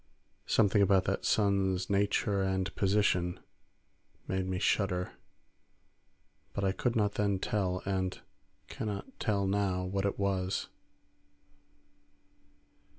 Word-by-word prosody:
Something 105 Hz, -2 st, +3 dB
about 95 Hz, -1 st, +4 dB
that 95 Hz, +1 st, -2 dB
sun's 95 Hz, -3 st, +2 dB
nature 100 Hz, 0 st, +1 dB
and 95 Hz, 0 st, -1 dB
position 95 Hz, -3 st, +1 dB, 0.9 s
made 95 Hz, 0 st, -1 dB
me 95 Hz, -1 st, -1 dB
shudder, 90 Hz, -2 st, 0 dB, 1.4 s
but 100 Hz, -, -2 dB
I 95 Hz, -, +3 dB
could 120 Hz, +5 st, -1 dB
not 105 Hz, -2 st, +2 dB
then 100 Hz, -2 st, +1 dB
tell, 95 Hz, -2 st, -1 dB
and 95 Hz, -1 st, -1 dB, 0.5 s
cannot 110 Hz, -, -5 dB
tell 100 Hz, -4 st, 0 dB
now, 95 Hz, -2 st, 0 dB
what 95 Hz, +2 st, -2 dB
it 100 Hz, -, -3 dB
was. 95 Hz, -1 st, -1 dB
100 Hz, 105 wpm, -31 LUFS, 95-100 Hz, 1.4 s, about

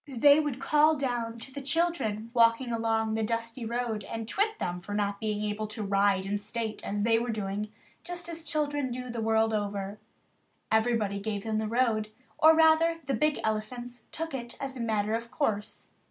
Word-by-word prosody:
They 285 Hz, +5 st, +7 dB
would 295 Hz, -5 st, -1 dB
call 305 Hz, +3 st, +4 dB
down 240 Hz, -5 st, -2 dB
to 260 Hz, +3 st, -9 dB
the 280 Hz, -, -5 dB
children 275 Hz, -8 st, 0 dB
walking 235 Hz, +1 st, +4 dB
along 225 Hz, -1 st, +1 dB
the 220 Hz, -, 0 dB
dusty 230 Hz, +2 st, -2 dB
road 230 Hz, -2 st, -2 dB
and 225 Hz, -1 st, -5 dB
twit 425 Hz, -, 0 dB
them 180 Hz, 0 st, -3 dB
for 205 Hz, +3 st, -5 dB
not 205 Hz, -1 st, -1 dB
being 210 Hz, -1 st, -2 dB
able 210 Hz, +1 st, -2 dB
to 215 Hz, 0 st, -5 dB
ride 195 Hz, -1 st, +2 dB
in 205 Hz, +1 st, -1 dB
state 215 Hz, +1 st, -4 dB
as 205 Hz, 0 st, -2 dB
they 225 Hz, 0 st, +4 dB
were 240 Hz, +1 st, -3 dB
doing, 210 Hz, -1 st, -3 dB, 0.3 s
just 350 Hz, -1 st, -6 dB
as 330 Hz, -1 st, -5 dB
children 290 Hz, -4 st, -1 dB
do 250 Hz, 0 st, -5 dB
the 230 Hz, -1 st, -3 dB
world 220 Hz, 0 st, +2 dB
over. 205 Hz, -1 st, -2 dB, 0.7 s
Everybody 220 Hz, -3 st, +2 dB
gave 205 Hz, -1 st, -3 dB
them 220 Hz, -1 st, -1 dB
the 220 Hz, -, -1 dB
road, 225 Hz, -2 st, +1 dB, 0.3 s
or, 315 Hz, +1 st, +8 dB
rather, 325 Hz, +1 st, +4 dB
the 270 Hz, -, -1 dB
big 300 Hz, +6 st, +1 dB
elephants 240 Hz, +3 st, -3 dB
took 325 Hz, -1 st, -4 dB
it 240 Hz, -2 st, -5 dB
as 270 Hz, -1 st, -4 dB
a -, -, -7 dB
matter 215 Hz, -2 st, 0 dB
of 230 Hz, +1 st, -2 dB
course. 220 Hz, -6 st, -2 dB
230 Hz, 190 wpm, -29 LUFS, 215-270 Hz, 0.7 s, or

